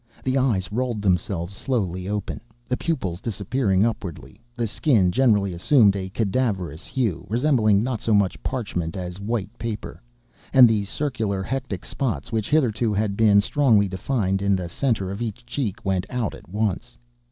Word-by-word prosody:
The 130 0 0
eyes 115 -9 +1
rolled 120 -2 -2
themselves 90 -1 0
slowly 95 -8 -2
open, 105 -1 -3 0.3
the 125 - 0
pupils 100 - -2
disappearing 105 -2 +1
upwardly; 100 -3 -5 0.2
the 120 - 0
skin 110 - +2
generally 105 -5 +3
assumed 100 +3 +4
a 95 -1 -4
cadaverous 95 - -1
hue, 115 - -2
resembling 115 -4 +3
not 125 -3 -2
so 115 - 0
much 100 -2 +1
parchment 95 -10 -3
as 90 0 -5
white 105 0 -3
paper; 115 -3 -5 0.5
and 130 -2 +9
the 105 -3 +1
circular 110 -5 -2
hectic 130 -4 -4
spots 125 -2 -3
which, 110 -2 -1
hitherto, 120 -7 +2
had 100 -1 0
been 105 -2 +5
strongly 110 -5 +3
defined 95 0 -1
in 100 0 +2
the 90 -2 -4
centre 110 -3 -1
of 100 +4 -5
each 120 +1 -5
cheek, 120 -5 -3
went 95 0 0
out 125 -4 -2
at - - -13
once. 105 +4 -2
105 Hz, 160 wpm, -24 LUFS, 95-120 Hz, 0.5 s, and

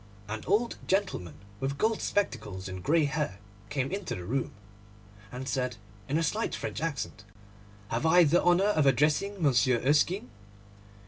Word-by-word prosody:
An 110 +1 -5
old 220 +5 +1
gentleman 185 - -1 0.2
with 135 +1 -2
gold 220 +4 +1
spectacles 105 - -2
and 95 -1 -6
grey 155 - +3
hair 145 -8 -2 0.3
came 135 0 -1
into 195 -1 -3
the 90 - -6
room, 130 +6 -1 0.8
and 130 +1 -6
said, 125 -3 -1 0.3
in 145 - +1
a 165 - +1
slight 215 +8 -1
French - - -4
accent, 150 -8 -3 0.7
'Have 120 +8 0
I 175 +2 +7
the 165 +3 +4
honour 175 +2 +4
of 155 -9 +3
addressing 150 - +2
Monsieur 130 -3 +4
Erskine? 150 - +2
145 Hz, 150 wpm, -29 LUFS, 125-175 Hz, 0.8 s, I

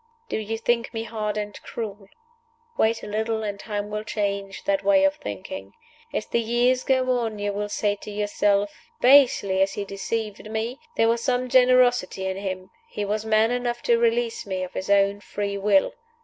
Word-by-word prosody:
"Do - - -1
you 220 +1 -3
think 235 +1 0
me 225 - -2
hard 215 -2 -3
and 210 -1 -5
cruel? 205 -3 -6 0.7
Wait 225 - +1
a - - -6
little, 220 +1 -1
and 205 -1 -4
time 205 -1 -4
will 210 0 -3
change 200 -2 -3
that 295 -1 0
way 290 -1 +4
of 290 0 +4
thinking. - - -7 0.4
As - - -2
the - - 0
years 240 +2 +2
go 255 -1 +2
on 225 -3 -3
you 205 0 -2
will 205 +1 -3
say 205 0 0
to 210 - -10
yourself, 205 -1 +1 0.3
'Basely 245 -8 +5
as 195 0 +2
he 205 - -4
deceived 210 +2 -4
me, 225 +4 -3 0.2
there 225 - +4
was 230 0 +2
some 255 -1 0
generosity 250 -6 +4
in 190 0 -2
him. 185 -1 -5 0.2
He 210 - -3
was 210 +2 -2
man 220 +1 +3
enough 245 -1 -2
to 235 -1 +3
release 235 0 +1
me 190 -2 -3
of 185 - -7
his 190 - -5
own 200 0 +3
free 205 0 -4
will. 195 -1 +3
215 Hz, 190 wpm, -24 LUFS, 200-240 Hz, 0.7 s, Basely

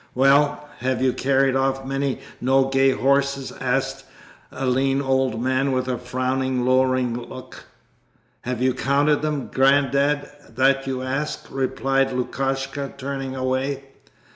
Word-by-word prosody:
'Well, 145 +3 +3
have 130 0 -1
you 130 -1 +3
carried 135 0 +2
off 135 0 0
many 135 0 -2 0.2
Nogay 135 +1 +3
horses?' 140 0 +1
asked - - -1 0.5
a 135 - -4
lean 135 +2 +2
old 130 -4 0
man 130 +2 +1
with 130 0 -1
a 125 -2 -2
frowning, 130 0 -1
lowering 130 -1 +2
look. 125 +1 -9 0.8
'Have 125 0 -3
you 130 0 +3
counted 140 +3 +2
them, 150 -3 -3
Grandad, 140 +1 +3 0.3
that 135 +1 +2
you 130 -1 -2
ask?' 135 +4 -3
replied 135 0 0
Lukashka, 135 +2 -2
turning 135 -1 -4
away. 130 +1 -1
135 Hz, 125 wpm, -23 LUFS, 130-135 Hz, 0.8 s, Well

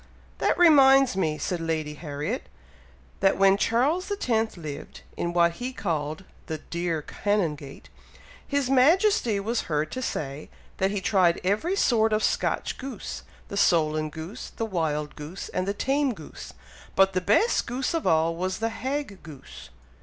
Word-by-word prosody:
"That - - +1
reminds 270 - +6
me," 160 -5 0
said 175 +2 -2
Lady 160 -2 -2
Harriet, 145 -1 -5 0.7
"that 195 0 +3
when 195 0 +5
Charles 275 - +1
X. 225 - 0
lived 155 -4 -8
in 170 - -2
what 170 -1 +3
he 245 +9 -5
called 160 -5 -3 0.2
the 160 - -3
'dear 170 -1 -3
Canongate,' 160 -10 -2 0.6
His 280 -2 0
Majesty 270 - +3
was 225 +4 -1
heard 150 0 0
to 255 - -4
say, 145 - -4 0.3
that 190 - +1
he 200 -1 -2
tried 185 -3 +3
every 215 - 0
sort 225 - +3
of 215 0 +1
Scotch - - -1
goose, 255 -5 -6 0.3
'the 200 - -6
solan 155 -4 +2
goose, 160 +6 -8
the 225 - -2
wild 155 -7 -2
goose, 155 +6 -7
and 185 +1 -2
the - - +1
tame 270 +1 0
goose; 155 - -10 0.4
but 195 0 +4
the 185 - 0
best 220 - +2
goose 255 +5 -2
of 330 - -1
all, 160 +1 +3
was 185 +2 -2
the 225 +1 -1
hag 260 -3 -4
goose.'" 150 - -12
195 Hz, 155 wpm, -26 LUFS, 160-250 Hz, 0.7 s, reminds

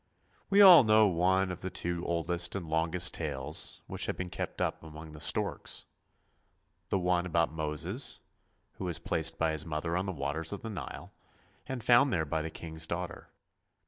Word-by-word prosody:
We 200 +1 +6
all 180 -7 +10
know 110 -1 +5
one 95 0 +2
of 90 - -7
the 95 - -3
two 85 -1 -3
oldest 85 +1 -1
and 90 -4 -4
longest 80 +3 +1
tales 65 +4 -3
which - - -2
have - - -2
been 90 -1 -5
kept - - -5
up - - -1
among 80 0 -10
the 75 - -11
storks; 80 - -1 1.0
the - - +1
one 90 -1 +1
about 85 -2 +1
Moses, 80 - -2 0.6
who 95 - -3
was 85 -3 -2
placed 80 -1 -1
by 80 -1 +1
his 80 -1 -3
mother 80 +1 -3
on 95 +2 -1
the - - -1
waters 80 +1 -3
of 100 - -6
the 115 - -5
Nile, 100 - -7 0.5
and 130 -3 -4
found 125 +4 +5
there 80 -6 +1
by 80 +2 -1
the 80 - -4
king's 80 0 -6
daughter. 85 +1 -5
85 Hz, 180 wpm, -31 LUFS, 80-95 Hz, 1.0 s, all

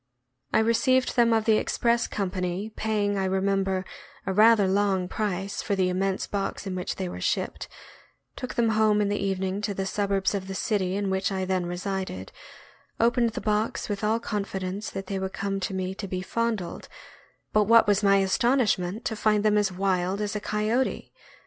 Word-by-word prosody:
I - - +3
received 255 +3 +2
them 235 -2 +4
of 220 -1 +2
the 220 -1 +4
express 235 0 +1
company, 185 +1 -3
paying, 205 -2 0
I 190 - 0
remem 195 +1 +1
ber, 190 -1 -2 0.4
a 190 - -1
rather 215 0 +6
long 190 -1 +1
price 195 -1 -2
for 200 - -1
the 185 -1 +2
immense 190 +1 -1
box 200 0 -3
in 190 - -3
which 180 -1 -3
they 190 - -3
were 175 - -7
shipped, - - -1 0.7
took 255 - -6
them 235 -3 +2
home 215 -1 +3
in 205 -1 +1
the 205 -1 -1
evening 190 0 -1
to 205 -1 -2
the 195 - -2
sub 200 +1 -1
urbs 195 0 +1
of 195 -2 -3
the 195 - -5
city 190 -3 0
in 200 -1 -1
which 190 0 0
I 190 -1 -1
then 185 -1 -1
resided, 180 - -4 0.7
opened 235 0 +2
the - - -4
box 215 +1 -1
with 205 0 -3
all 220 +2 +2
confidence 200 -2 -3
that 195 - -6
they 195 0 -3
would 190 0 -4
come 195 0 -2
to 195 - -3
me 185 0 -2
to 195 +1 -6
be 185 -1 -3
fondled; 230 -5 -2 0.6
but 215 -1 +4
what 230 +2 +6
was 205 -1 +3
my 200 -1 +5
astonishment 205 -1 +1
to 220 - -1
find 210 -1 +2
them 210 -1 +4
as 205 -2 +2
wild 185 0 0
as 210 0 -2
a - - 0
coyote. 215 +5 -1
200 Hz, 195 wpm, -26 LUFS, 190-215 Hz, 0.7 s, rather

